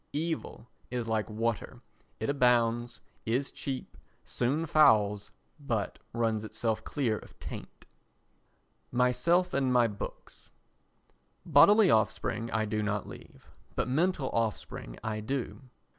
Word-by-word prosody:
Evil 160 -4 -3 0.2
is 120 -2 -3
like 110 -1 -1
water, 115 +2 -2 0.4
it - - -2
abounds, 120 -3 +2 0.2
is 125 +5 -1
cheap, 135 -2 -5 0.3
soon 140 +7 -1
fouls, 105 -10 +4 0.3
but 115 -8 -2
runs 115 -2 0
itself 110 0 -2
clear 120 -7 -1
of - - -16
taint. - - -9 1.1
Myself 170 +9 +2
and 135 -2 +1
My 125 -1 +5
Books 105 -2 -8 1.0
Bodily 190 +6 +6
offspring 110 +1 +1
I 110 -1 0
do 105 0 -1
not 105 -1 -2
leave, - - -13 0.2
but - - 0
mental 150 +1 +1
offspring 110 - -3
I 110 -1 -2
do. 130 +4 -3
120 Hz, 115 wpm, -30 LUFS, 110-140 Hz, 1.1 s, Bodily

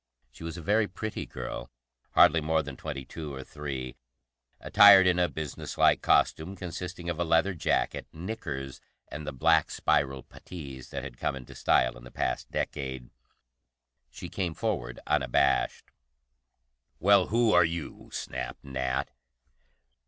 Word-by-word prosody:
She - - -12
was 85 +1 -5
a 85 - -8
very 105 +4 +2
pretty 105 +3 -5
girl, - - -6 0.5
hardly 80 - +6
more 80 +1 +1
than 70 -2 -7
twenty 70 -1 -6
two 75 0 -7
or 65 - -7
three, 65 -3 -6 0.6
attired 100 -2 +8
in 90 -1 +3
a 90 - +3
businesslike 75 -3 0
costume 85 +5 +2
consisting 90 -1 -6
of 85 -1 -2
a - - +2
leather 85 +4 +2
jacket, 85 - -1
knickers, 70 - -6 0.3
and 75 +1 -7
the - - -2
black 80 +4 +3
spiral 70 -1 0
puttees 70 -7 -10
that - - -5
had 65 -3 -9
come - - -1
into 65 -2 -10
style - - +2
in - - -14
the 60 - -11
past - - -2
decade. 65 -3 -4 1.0
She - - -8
came 90 -5 -3
forward 90 - -2
unabashed. 65 +1 +1 1.1
"Well, 100 -1 +5
who 115 0 +3
are 90 - +7
you?" 85 -1 -4
snapped - - -5
Nat. 65 -1 -2
80 Hz, 145 wpm, -28 LUFS, 65-90 Hz, 1.1 s, attired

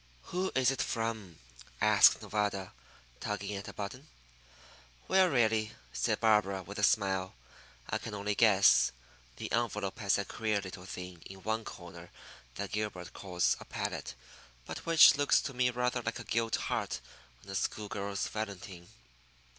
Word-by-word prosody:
"Who 185 +1 0
is 130 -1 +4
it 135 - -2
from?" 110 -7 -3 0.4
asked - - +6
Nevada, 100 -3 -2 0.5
tugging 105 0 -3
at 100 +1 -6
a - - -7
button. 125 +8 -6 1.0
"Well, 190 -1 +5
really," 110 -5 +2 0.2
said - - 0
Barbara, 105 -4 +3
with 100 +3 -8
a - - -1
smile, 95 -3 +2 0.5
"I - - -1
can 110 - -6
only 105 +1 -1
guess. 100 -3 +5 0.4
The - - -6
envelope 105 -3 -1
has 100 -3 +2
that 100 - -2
queer 110 -2 -1
little 95 -1 -8
thing 90 -2 -8
in 95 -1 -12
one 110 +3 -1
corner 85 -1 -10 0.5
that 100 +6 -4
Gilbert 105 -4 -4
calls 90 -3 0
a - - -10
palette, - - -4 0.5
but - - -7
which 165 -3 +8
looks 145 0 +4
to 135 - -5
me 125 0 +2
rather 125 0 -1
like 115 0 -3
a 120 - -7
gilt 115 0 0
heart - - -2 0.4
on 100 - -10
a - - -5
school 105 +2 -2
girl's 100 0 -3
valentine." 100 -4 -6
105 Hz, 155 wpm, -32 LUFS, 95-115 Hz, 1.0 s, which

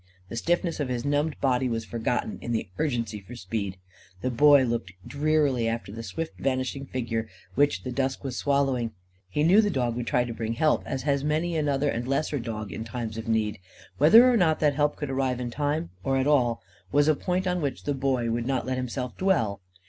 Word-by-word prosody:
The - - -6
stiffness 170 +7 0
of 140 -3 -1
his 125 0 -2
numbed 145 +2 0
body 130 -1 +2
was 115 -1 -2
forgotten 115 0 -2
in 120 - -3
the 110 - -1
urgency 115 -8 -1
for 100 +5 -11
speed. 100 -2 -4 0.4
The 130 - -1
Boy 145 +3 +6
looked 115 -6 -2
drearily 145 -5 +1
after 115 -3 -3
the 115 +2 -6
swift 160 +8 -5
vanishing 135 +1 -1
figure 115 -3 -3 0.2
which 145 +5 +2
the 130 - -4
dusk 130 +1 -1
was 135 -3 -4
swallowing. 135 -5 +1 0.4
He 150 +10 0
knew 190 +7 +6
the 210 - +1
dog 125 - 0
would 120 -1 -4
try 125 +3 +2
to 120 -1 -5
bring 115 0 -3
help; 155 +6 +2
as 135 -2 -3
has 140 -1 +1
many 160 +3 0
another 145 -2 +1
and 120 -2 -2
lesser 145 +1 0
dog 110 -4 -5
in 80 - -5
times 115 -1 -5
of 115 +1 -6
need. 110 -2 0 0.4
Whether 220 - +8
or 250 -2 +4
not 160 -6 +3
that 150 -2 +3
help 150 +1 +1
could 145 -3 -4
arrive 130 -2 0
in 120 -1 -3
time, 145 - -1
or 135 0 +1
at 130 - +1
all, 125 -7 +2 0.3
was 145 +1 +4
a 155 - +6
point 180 +5 -1
on 180 -1 0
which 140 -4 -3
the 145 - 0
Boy 130 -3 0
would 120 +1 -1
not 135 -2 0
let 130 0 -2
himself 125 0 -4
dwell. 115 - +1
130 Hz, 215 wpm, -27 LUFS, 115-145 Hz, 0.4 s, Whether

